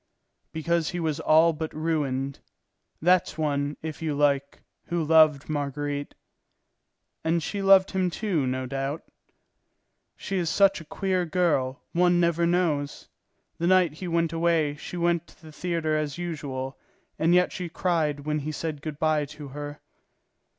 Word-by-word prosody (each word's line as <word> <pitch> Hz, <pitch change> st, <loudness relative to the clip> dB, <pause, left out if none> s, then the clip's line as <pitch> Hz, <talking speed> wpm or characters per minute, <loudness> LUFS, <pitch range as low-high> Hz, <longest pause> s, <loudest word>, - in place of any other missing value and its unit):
"Because 165 Hz, 0 st, 0 dB
he 180 Hz, -, -4 dB
was 160 Hz, -2 st, -1 dB
all 160 Hz, +1 st, +5 dB
but 160 Hz, 0 st, -4 dB
ruined. 140 Hz, -4 st, -1 dB, 0.6 s
That's 180 Hz, 0 st, +3 dB
one, 145 Hz, -2 st, -1 dB
if 160 Hz, -1 st, -6 dB
you 155 Hz, -3 st, -1 dB
like, 140 Hz, -1 st, +1 dB, 0.2 s
who 170 Hz, -2 st, -1 dB
loved 155 Hz, -2 st, +5 dB
Marguerite." 145 Hz, -1 st, -3 dB, 1.1 s
"And 165 Hz, 0 st, +1 dB
she 200 Hz, +5 st, -3 dB
loved 195 Hz, -1 st, +6 dB
him, 185 Hz, -2 st, +1 dB
too, 175 Hz, -7 st, -1 dB
no 130 Hz, 0 st, -2 dB
doubt?" 135 Hz, +3 st, -3 dB, 1.1 s
"She 195 Hz, -, -3 dB
is 170 Hz, -2 st, 0 dB
such 195 Hz, +2 st, +3 dB
a -, -, -12 dB
queer 185 Hz, +2 st, -1 dB
girl, 150 Hz, -7 st, 0 dB
one 175 Hz, 0 st, +3 dB
never 170 Hz, 0 st, +2 dB
knows. 160 Hz, -5 st, 0 dB, 0.5 s
The 170 Hz, -, +1 dB
night 180 Hz, -4 st, +4 dB
he 180 Hz, +4 st, -7 dB
went 165 Hz, -1 st, 0 dB
away 165 Hz, -3 st, +2 dB
she 165 Hz, +4 st, -7 dB
went 170 Hz, -1 st, +1 dB
to -, -, -20 dB
the 160 Hz, -1 st, -13 dB
theatre 165 Hz, -1 st, -1 dB
as 150 Hz, -1 st, -2 dB
usual, 140 Hz, -6 st, -5 dB, 0.4 s
and 165 Hz, +3 st, +4 dB
yet 180 Hz, 0 st, +4 dB
she 180 Hz, -, -5 dB
had 170 Hz, -, -9 dB
cried 160 Hz, -5 st, 0 dB
when 150 Hz, +1 st, -1 dB
he 150 Hz, +2 st, -4 dB
said 155 Hz, -1 st, -4 dB
good 150 Hz, -1 st, -5 dB
bye 155 Hz, -1 st, +1 dB
to 145 Hz, 0 st, -10 dB
her." 145 Hz, +1 st, -7 dB
160 Hz, 155 wpm, -26 LUFS, 145-170 Hz, 1.1 s, loved